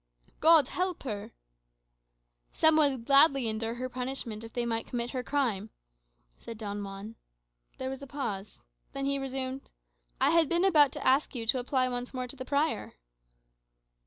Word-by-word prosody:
"God 315 -4 +6
help 365 -1 -2
her!" 210 -6 -5 1.2
"Some 315 0 +5
would 275 -6 +3
gladly 275 -2 +5
endure 225 +1 -2
her 255 +1 -4
punishment 250 -3 -4
if 225 - -9
they 240 0 -2
might 230 -1 -2
commit 240 0 -3
her 255 - -3
crime," 240 -7 -1 0.7
said 230 - -9
Don 205 -1 -5
Juan. 200 +3 -8 0.6
There 260 0 -4
was 270 - -7
a 275 - -8
pause; 215 -8 -5 0.3
then 275 0 -3
he 275 0 0
resumed, 265 0 -4 0.5
"I - - +3
had 330 -3 +3
been 345 +2 +2
about 300 -7 +5
to - - -7
ask 270 +2 +2
you 230 -2 -3
to 255 +3 +2
apply 255 +1 0
once 245 +1 -4
more 255 0 -2
to 250 - -7
the 255 -1 -7
prior." 290 +4 -1
255 Hz, 165 wpm, -29 LUFS, 230-280 Hz, 1.2 s, God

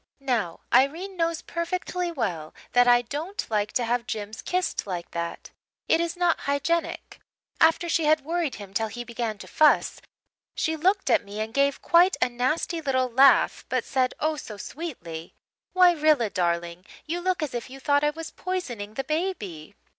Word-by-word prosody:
Now, 240 -11 -1
Irene 320 +10 +2
knows 335 -2 -1
perfectly 355 +1 -3
well 180 - -3 0.2
that 245 0 +5
I 245 0 +6
don't 310 - -4
like 210 -1 0
to 245 - +1
have 235 +1 -1
Jims 210 0 -5
kissed 365 - -1
like 180 -3 -5
that. 170 0 -5 0.4
It 325 - +3
is 340 +1 -2
not 350 -1 +2
hygienic. 300 +4 -1 0.4
After 325 +2 +4
she 330 -1 +1
had 305 -2 +3
worried 330 -4 -1
him 200 -2 -10
till 220 +2 0
he 240 +3 -6
began 235 -2 -4
to - - -11
fuss, 310 -1 +3 0.5
she 320 - 0
looked 380 +5 +1
at - - +4
me 205 +1 -8
and 220 +1 -3
gave 280 +1 +1
quite 355 +3 +5
a - - +2
nasty 280 +7 -1
little 260 -4 0
laugh 270 +3 +5
but - - 0
she - - -16
said, 260 -2 +1
oh, 310 0 0
so 220 -6 -8
sweetly, 180 - -7 0.4
"'Why, 365 -1 +7
Rilla, 300 - +2
darling, 170 0 -1 0.2
you 340 +3 -3
look 365 -2 0
as 295 - -4
if 240 +1 -4
you 270 +1 -10
thought 285 +1 +2
I 295 - +4
was 325 +2 -7
poisoning 240 - -5
the 270 - -2
baby.' 240 - -3
275 Hz, 180 wpm, -26 LUFS, 220-335 Hz, 0.5 s, Why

